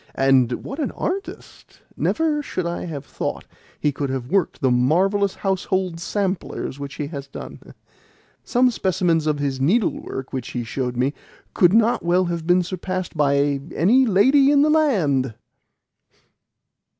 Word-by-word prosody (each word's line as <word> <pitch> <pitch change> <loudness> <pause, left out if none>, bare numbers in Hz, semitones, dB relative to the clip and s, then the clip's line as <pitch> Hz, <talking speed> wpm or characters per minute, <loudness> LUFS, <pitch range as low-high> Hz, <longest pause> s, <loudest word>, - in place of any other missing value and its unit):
And 130 -3 +2
what 270 - -6
an 290 - -1
artist! 390 +3 -6
Never 315 -2 0
should 185 -10 -4
I 170 +1 -3
have 150 -5 -6
thought - - -4 0.3
he 150 - +1
could 140 0 -3
have 130 -2 -4
worked 195 -4 +1
the 130 -3 +2
marvellous 185 +11 +2
household 190 -2 -1
samplers 185 -6 -3
which 140 0 -6
he 150 - -3
has 140 -3 -7
done! 140 - -10 0.7
Some 250 0 +2
specimens 175 -6 0
of 150 -1 +1
his 140 -2 -2
needlework 155 - -1
which 130 -3 -5
he 120 - -2
showed 125 +1 -3
me 130 +3 +1 0.4
could 175 0 +4
not 230 +1 +3
well 180 +2 +2
have 170 -2 -4
been 180 0 +4
surpassed 185 0 -4
by 140 -1 +2
any 245 +10 +4
lady 265 +8 +5
in 285 0 +5
the 305 - +3
land!" 155 - +2
170 Hz, 150 wpm, -22 LUFS, 140-200 Hz, 0.7 s, lady